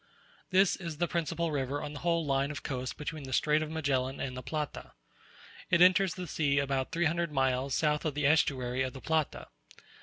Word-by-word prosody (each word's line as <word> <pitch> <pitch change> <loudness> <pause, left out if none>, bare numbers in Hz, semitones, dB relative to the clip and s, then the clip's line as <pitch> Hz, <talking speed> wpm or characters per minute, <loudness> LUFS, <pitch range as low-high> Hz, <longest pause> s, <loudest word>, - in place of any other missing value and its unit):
This 190 0 +4
is 170 -4 -6
the 175 +2 +1
principal 170 0 -1
river 140 0 -1
on 150 - -5
the 145 - -7
whole 170 -2 +1
line 135 0 +1
of 145 -1 -6
coast 130 -2 -4
between 150 -1 -5
the 130 - -6
Strait 150 +4 +3
of 155 - -3
Magellan 140 -4 -1
and 130 -1 -3
the 130 - -5
Plata. 150 +1 -5 0.8
It 170 - +4
enters 185 +1 +5
the 185 - -5
sea 145 -3 0
about 135 -1 0
three 170 +1 +1
hundred 170 +1 0
miles 130 -1 +1
south 150 -1 +1
of 155 -4 -2
the 145 -1 0
estuary 130 -4 +2
of 130 -1 -1
the 130 - -9
Plata. 160 -2 -1
150 Hz, 205 wpm, -30 LUFS, 135-165 Hz, 0.8 s, enters